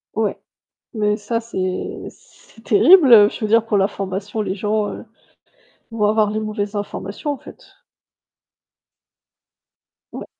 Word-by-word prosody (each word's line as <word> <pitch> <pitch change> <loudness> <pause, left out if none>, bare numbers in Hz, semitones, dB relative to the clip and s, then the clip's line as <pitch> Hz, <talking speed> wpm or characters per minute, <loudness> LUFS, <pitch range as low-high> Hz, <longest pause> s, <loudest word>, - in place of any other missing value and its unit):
Ouais. - - -1 0.6
Mais 210 -1 0
ça 230 +2 -3
c'est 185 -5 -4
c'est 225 - -22
terrible, 290 - +6
heu, 205 -3 +8
je - - -9
veux 215 - -2
dire 225 +1 +3
pour 215 - 0
l'information, 195 +1 -2
les 190 - -3
gens 210 +1 -2 0.9
vont 215 -2 0
avoir 210 -1 +2
les 215 - -2
mauvaises 210 -1 -4
informations, 205 +6 -5
en 285 - -4
fait. - - -15 2.5
Ouais. - - -7
210 Hz, 125 wpm, -19 LUFS, 205-225 Hz, 2.5 s, heu